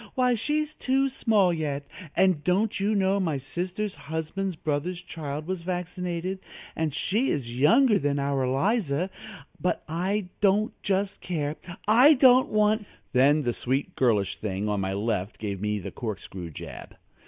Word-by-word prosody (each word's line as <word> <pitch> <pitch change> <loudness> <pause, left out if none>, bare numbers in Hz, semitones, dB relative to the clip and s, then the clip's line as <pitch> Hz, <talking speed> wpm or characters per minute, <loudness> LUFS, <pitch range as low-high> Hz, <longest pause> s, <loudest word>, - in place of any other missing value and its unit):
Why, 250 -1 +3
she's 300 +6 -1
too 270 0 +1
small 210 -8 +2
yet, 145 -3 -3 0.3
and 185 -6 +3
don't 195 +6 +1
you 205 +2 +1
know 195 0 +2
my 165 -7 0
sister's 180 +9 -3
husband's 160 +5 -4
brother's 155 +4 -2
child 155 -4 -6
was 185 0 -3
vaccinated, 180 +1 -3 0.4
and 160 -1 0
she 215 - 0
is 120 -3 -2
younger 220 - +5
than 145 0 0
our 140 -1 0
Eliza, 175 - 0 0.5
but 180 -2 -1
I 185 +4 -1
don't 210 +3 +3
just 195 0 -1
care, 150 -4 -2 0.3
I 250 +8 +7
don't 255 -1 +6
want 215 0 +2
" - - -40
Then 145 +4 +4
the 120 -2 0
sweet 130 +4 -2
girlish 105 -7 +1
thing 100 0 -3
on 105 -1 0
my 95 0 -1
left 105 0 -2
gave 100 -3 -4
me 105 0 0
the 95 - -6
corkscrew 95 -6 -6
jab. 80 - -9
175 Hz, 155 wpm, -26 LUFS, 140-205 Hz, 0.5 s, I